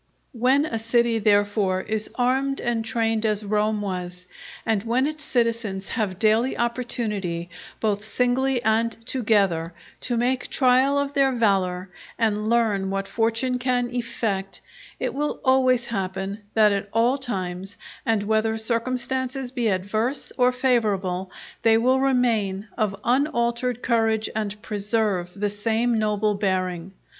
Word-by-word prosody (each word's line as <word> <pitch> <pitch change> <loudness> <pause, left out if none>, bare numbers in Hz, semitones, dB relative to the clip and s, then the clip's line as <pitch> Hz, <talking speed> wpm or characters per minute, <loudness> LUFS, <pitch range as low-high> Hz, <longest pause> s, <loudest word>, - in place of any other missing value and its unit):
When 260 +5 +3
a 225 -7 -3
city 230 0 +2
therefore 205 -2 +2
is 215 +2 -3
armed 265 +2 +1
and 235 -1 -1
trained 225 -1 0
as 215 -1 0
Rome 210 0 0
was, 180 -2 -5 0.4
and 220 -3 +1
when 235 +5 +1
its 305 0 -4
citizens 230 -6 -1
have 210 -6 -2
daily 220 +5 +2
opportunity, 210 -8 -2 0.3
both 210 -2 0
singly 250 +3 +1
and 225 +1 +2
together, 200 -10 +1 0.2
to 240 -2 -2
make 245 +2 0
trial 260 +2 +3
of 280 0 -1
their 275 -2 +3
valour 190 -6 +1 0.3
and 215 -2 0
learn 215 -5 +2
what 195 0 -2
fortune 230 +3 0
can 245 -1 0
effect, 220 -5 -3 0.4
it - - -2
will 295 +2 -2
always 255 -2 +4
happen, 195 -2 -3 0.2
that 215 -1 +5
at 200 0 -2
all 240 +5 +2
times, 190 -5 -4 0.3
and 220 -3 +1
whether 220 +1 +1
circumstances 255 +3 -2
be 245 -3 -1
adverse 215 +7 -1
or 250 -1 +4
favourable, 205 -8 0 0.3
they 225 0 +5
will 255 +3 +3
remain 230 -7 +1
of 205 -4 -1
unaltered 245 -2 0
courage 225 -2 +1
and 210 -1 -3
preserve 205 -3 -1
the 205 0 -1
same 225 +3 0
noble 210 0 +1
bearing. 185 -3 -1
225 Hz, 135 wpm, -24 LUFS, 200-245 Hz, 0.4 s, that